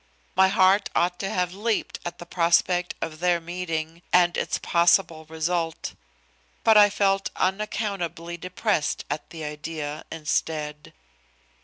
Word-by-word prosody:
My 190 Hz, +1 st, +6 dB
heart 190 Hz, +1 st, +4 dB
ought 175 Hz, +1 st, +1 dB
to 195 Hz, -, -2 dB
have 180 Hz, -1 st, -1 dB
leaped 215 Hz, +3 st, -2 dB
at 175 Hz, -, -5 dB
the 175 Hz, -, -9 dB
prospect 175 Hz, +1 st, +2 dB
of 155 Hz, -1 st, -6 dB
their 175 Hz, -1 st, +2 dB
meeting 165 Hz, -1 st, -4 dB
and 175 Hz, -1 st, +4 dB
its -, -, -1 dB
possible 170 Hz, -2 st, +2 dB
result. 165 Hz, +1 st, -2 dB, 0.7 s
But 225 Hz, -, +6 dB
I 205 Hz, -1 st, +8 dB
felt 195 Hz, -1 st, +1 dB
unaccountably 190 Hz, -4 st, -2 dB
depressed 185 Hz, -1 st, -1 dB
at 145 Hz, -, -4 dB
the 160 Hz, -2 st, -8 dB
idea, 150 Hz, 0 st, -5 dB
instead. 150 Hz, -1 st, -3 dB
175 Hz, 130 wpm, -25 LUFS, 160-190 Hz, 0.7 s, I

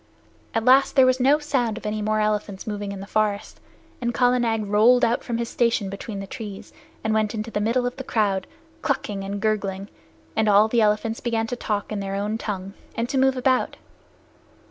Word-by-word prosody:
At 225 Hz, 0 st, 0 dB
last 265 Hz, +2 st, +5 dB
there 265 Hz, -2 st, +7 dB
was 255 Hz, 0 st, +3 dB
no 275 Hz, +4 st, +5 dB
sound 260 Hz, -7 st, -1 dB
of 230 Hz, -, -9 dB
any 215 Hz, 0 st, -2 dB
more 215 Hz, +1 st, +1 dB
elephants 210 Hz, -2 st, -1 dB
moving 205 Hz, -2 st, -4 dB
in 195 Hz, -1 st, -6 dB
the -, -, -6 dB
forest, 210 Hz, 0 st, -1 dB, 0.4 s
and 240 Hz, -1 st, -1 dB
Kala 250 Hz, 0 st, +3 dB
Nag 225 Hz, -3 st, 0 dB
rolled 220 Hz, +5 st, +5 dB
out 235 Hz, +2 st, 0 dB
from 235 Hz, -2 st, -2 dB
his 235 Hz, 0 st, -2 dB
station 230 Hz, -5 st, 0 dB
between 200 Hz, +1 st, -6 dB
the 195 Hz, -, -5 dB
trees 205 Hz, -1 st, -8 dB, 0.3 s
and 220 Hz, -, 0 dB
went 215 Hz, 0 st, +1 dB
into 220 Hz, +1 st, -4 dB
the 210 Hz, -, -1 dB
middle 235 Hz, +4 st, +1 dB
of 245 Hz, -, -3 dB
the 265 Hz, -, -5 dB
crowd, 200 Hz, -6 st, 0 dB, 0.3 s
clucking 205 Hz, -8 st, -2 dB
and 200 Hz, +1 st, -4 dB
gurgling, 200 Hz, -2 st, -1 dB, 0.5 s
and 220 Hz, -1 st, +2 dB
all 205 Hz, +1 st, +6 dB
the 230 Hz, +1 st, +2 dB
elephants 215 Hz, +2 st, +1 dB
began 230 Hz, -2 st, -1 dB
to 245 Hz, -, -3 dB
talk 210 Hz, -4 st, -3 dB
in 210 Hz, -, -2 dB
their 195 Hz, 0 st, -3 dB
own 210 Hz, +2 st, -2 dB
tongue, 195 Hz, -3 st, -4 dB, 0.2 s
and 230 Hz, +1 st, -1 dB
to 270 Hz, -, +1 dB
move 265 Hz, 0 st, +3 dB
about. 255 Hz, 0 st, +1 dB
220 Hz, 210 wpm, -24 LUFS, 205-240 Hz, 0.5 s, there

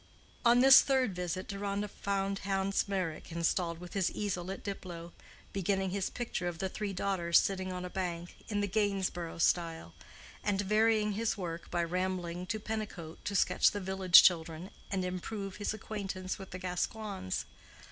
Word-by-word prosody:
On 240 Hz, 0 st, +6 dB
this 270 Hz, 0 st, +10 dB
third 260 Hz, -7 st, +1 dB
visit 180 Hz, +1 st, -3 dB
Deronda 200 Hz, 0 st, -2 dB
found 195 Hz, -1 st, -2 dB
Hans 195 Hz, 0 st, 0 dB
Meyrick 185 Hz, -5 st, -3 dB
installed 170 Hz, 0 st, 0 dB
with 180 Hz, -1 st, -10 dB
his 195 Hz, -3 st, +1 dB
easel 190 Hz, -4 st, -3 dB
at 195 Hz, -, -5 dB
Diplow, 175 Hz, -4 st, -6 dB, 0.4 s
beginning 195 Hz, 0 st, 0 dB
his 195 Hz, 0 st, -1 dB
picture 235 Hz, -7 st, -3 dB
of 175 Hz, -2 st, -3 dB
the 190 Hz, +2 st, -2 dB
three 210 Hz, +1 st, -3 dB
daughters 180 Hz, -3 st, +2 dB
sitting 190 Hz, -1 st, +1 dB
on 180 Hz, 0 st, -4 dB
a -, -, -5 dB
bank, 175 Hz, -2 st, -4 dB
"in 205 Hz, -1 st, -1 dB
the 205 Hz, -, 0 dB
Gainsborough 195 Hz, -5 st, -1 dB
style," 165 Hz, -1 st, +1 dB, 0.5 s
and 205 Hz, -2 st, +1 dB
varying 215 Hz, +1 st, +3 dB
his 220 Hz, +2 st, -1 dB
work 170 Hz, -3 st, -5 dB
by 175 Hz, -1 st, 0 dB
rambling 180 Hz, 0 st, -2 dB
to 220 Hz, +1 st, -2 dB
Pennicote 210 Hz, -7 st, -5 dB
to 200 Hz, -, -2 dB
sketch -, -, +4 dB
the 205 Hz, -, -4 dB
village 190 Hz, -2 st, +7 dB
children 170 Hz, 0 st, +1 dB, 0.2 s
and 190 Hz, -2 st, -1 dB
improve 195 Hz, +2 st, -4 dB
his 205 Hz, -, -1 dB
acquaintance 195 Hz, -3 st, -4 dB
with 190 Hz, -, -9 dB
the 185 Hz, -, -6 dB
Gascoignes. 185 Hz, -, -3 dB
190 Hz, 165 wpm, -32 LUFS, 175-205 Hz, 0.5 s, this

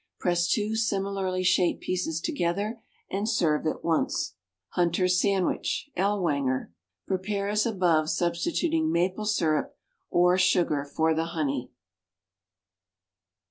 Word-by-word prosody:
Press 175 Hz, -1 st, +1 dB
two 215 Hz, -1 st, 0 dB
similarly 195 Hz, -4 st, -1 dB
shaped 180 Hz, -1 st, +2 dB
pieces 175 Hz, -3 st, -2 dB
together 200 Hz, +7 st, -2 dB, 0.3 s
and 200 Hz, +3 st, -1 dB
serve 160 Hz, -8 st, +1 dB
at -, -, -3 dB
once. 165 Hz, -1 st, 0 dB, 0.4 s
=Hunter's 180 Hz, +1 st, +2 dB
Sandwich 200 Hz, +8 st, 0 dB
(Ellwanger).= 150 Hz, -, 0 dB, 0.3 s
Prepare 200 Hz, +1 st, -2 dB
as 210 Hz, +2 st, +1 dB
above, 175 Hz, -7 st, +2 dB
substituting 315 Hz, -, 0 dB
maple 185 Hz, +5 st, 0 dB
syrup 165 Hz, -8 st, 0 dB, 0.3 s
(or 180 Hz, +1 st, +4 dB
sugar) 170 Hz, -6 st, +2 dB
for 160 Hz, +3 st, +1 dB
the 160 Hz, +1 st, 0 dB
honey. 135 Hz, -5 st, -1 dB
180 Hz, 105 wpm, -27 LUFS, 165-200 Hz, 0.4 s, or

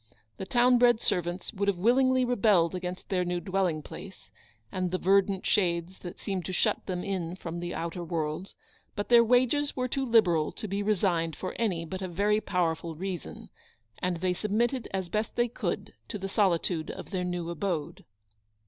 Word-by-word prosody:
The 190 Hz, -, -6 dB
town 245 Hz, +2 st, +4 dB
bred 240 Hz, -2 st, +5 dB
servants 175 Hz, -2 st, -2 dB
316 210 Hz, -, -15 dB
would 200 Hz, -, +1 dB
have 200 Hz, -3 st, +2 dB
willingly 255 Hz, +5 st, +4 dB
rebelled 205 Hz, -8 st, +3 dB
against 180 Hz, 0 st, -5 dB
their 185 Hz, -2 st, +1 dB
new 175 Hz, 0 st, -1 dB
dwelling 185 Hz, -5 st, 0 dB
place, 185 Hz, -, -11 dB, 0.4 s
and 185 Hz, -1 st, -1 dB
the 185 Hz, -, -1 dB
verdant 195 Hz, +1 st, +2 dB
shades 175 Hz, -2 st, +1 dB
that 175 Hz, -, -8 dB
seemed 190 Hz, -3 st, -3 dB
to -, -, -3 dB
shut -, -, 0 dB
them 180 Hz, -2 st, -2 dB
in 180 Hz, -3 st, -3 dB
from 170 Hz, -2 st, -6 dB
the 175 Hz, 0 st, -4 dB
outer 170 Hz, +1 st, -4 dB
world; 160 Hz, +2 st, -3 dB, 0.4 s
but 205 Hz, -, -3 dB
their 235 Hz, -1 st, +8 dB
wages 255 Hz, +5 st, +2 dB
were 255 Hz, -1 st, 0 dB
too 270 Hz, +2 st, -1 dB
liberal 190 Hz, -, +3 dB
to 215 Hz, -, -6 dB
be 200 Hz, +1 st, -2 dB
resigned 180 Hz, -6 st, +1 dB
for 185 Hz, -, -5 dB
any 185 Hz, -8 st, 0 dB
but 185 Hz, +3 st, -6 dB
a 190 Hz, -, -2 dB
very 205 Hz, +4 st, +1 dB
powerful 165 Hz, -3 st, -1 dB
reason, 185 Hz, +1 st, -6 dB, 0.5 s
and 180 Hz, -1 st, -1 dB
they 180 Hz, +1 st, 0 dB
sub 210 Hz, +4 st, -4 dB
mitted 240 Hz, +4 st, +1 dB
as 190 Hz, -2 st, -2 dB
best 215 Hz, +5 st, -2 dB
they 240 Hz, 0 st, +2 dB
could 235 Hz, -, -3 dB
to 215 Hz, -, -4 dB
the 195 Hz, -1 st, -4 dB
solitude 180 Hz, -5 st, +1 dB
of -, -, -7 dB
their 185 Hz, -2 st, -1 dB
new 175 Hz, -1 st, -3 dB
abode. 170 Hz, -2 st, -3 dB
185 Hz, 190 wpm, -29 LUFS, 175-215 Hz, 0.5 s, their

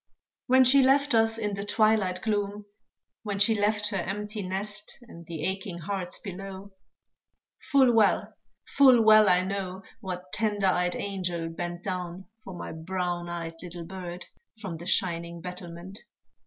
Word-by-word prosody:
When 260 Hz, 0 st, +6 dB
she 265 Hz, +2 st, +6 dB
left 275 Hz, +2 st, +3 dB
us 225 Hz, 0 st, +3 dB
in 210 Hz, -2 st, -2 dB
the 200 Hz, 0 st, -3 dB
twilight 210 Hz, -3 st, +2 dB
gloom, 205 Hz, -1 st, -1 dB, 0.6 s
When 205 Hz, -3 st, -3 dB
she 205 Hz, +3 st, +4 dB
left 210 Hz, 0 st, +1 dB
her 200 Hz, -, -2 dB
empty 210 Hz, +3 st, -4 dB
nest, 195 Hz, +3 st, -4 dB
And 170 Hz, -8 st, -13 dB
the 160 Hz, -3 st, -5 dB
aching 190 Hz, 0 st, -3 dB
hearts 180 Hz, +1 st, -3 dB
below; 195 Hz, 0 st, -8 dB, 1.0 s
Full 265 Hz, -4 st, +5 dB
well, 220 Hz, -3 st, +3 dB, 0.3 s
full 260 Hz, -4 st, +6 dB
well 215 Hz, -1 st, +7 dB
I 180 Hz, 0 st, +4 dB
know, 190 Hz, -1 st, -4 dB, 0.2 s
What 185 Hz, -3 st, -7 dB
tender 205 Hz, -1 st, +1 dB
eyed 180 Hz, -1 st, +2 dB
angel 180 Hz, -4 st, -3 dB
bent 175 Hz, +2 st, -5 dB
Down 180 Hz, -1 st, -4 dB, 0.2 s
for 190 Hz, -, -8 dB
my -, -, -6 dB
brown 175 Hz, +1 st, -3 dB
eyed 165 Hz, -1 st, -5 dB
little 175 Hz, -1 st, -8 dB
bird, 180 Hz, 0 st, -7 dB, 0.3 s
From 190 Hz, -6 st, -5 dB
the 170 Hz, +2 st, -9 dB
shining 170 Hz, -2 st, -1 dB
battlement. 180 Hz, +2 st, -8 dB
190 Hz, 150 wpm, -27 LUFS, 180-210 Hz, 1.0 s, well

